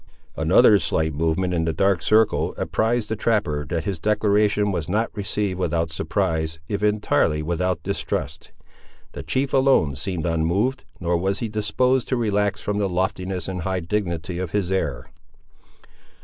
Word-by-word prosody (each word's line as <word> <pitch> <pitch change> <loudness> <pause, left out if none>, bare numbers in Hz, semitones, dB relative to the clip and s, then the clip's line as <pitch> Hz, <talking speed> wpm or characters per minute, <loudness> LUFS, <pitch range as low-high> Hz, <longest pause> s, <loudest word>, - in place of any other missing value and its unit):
Another 105 - +5
slight 80 -3 0
movement 80 +4 0
in 80 -2 0
the 80 - 0
dark 95 +1 +2
circle 90 -5 +2
apprised 110 +5 0
the 110 - -2
trapper 100 -10 0
that 85 -2 -2
his 95 -5 -3
declaration 105 0 +2
was 85 -3 -3
not 110 +5 -1
received 100 -2 -2
without 85 -3 0
surprise, 80 -1 -1
if 100 +2 -3
entirely 105 -7 +1
without 85 +1 -1
distrust. 100 +1 -3 0.6
The - - -7
chief 135 +1 -1
alone 130 - +3
seemed 80 +4 -3
unmoved; 85 +10 0
nor 85 0 0
was 95 +3 0
he 115 - -3
disposed 125 +5 +1
to 130 - 0
relax 105 -2 0
from 105 0 -2
the 100 -2 0
loftiness 95 0 -2
and 95 -2 -4
high 95 +1 -2
dignity 85 -1 -3
of 95 -2 -3
his 95 0 -1
air. 70 -9 -1
95 Hz, 155 wpm, -23 LUFS, 80-105 Hz, 0.6 s, Another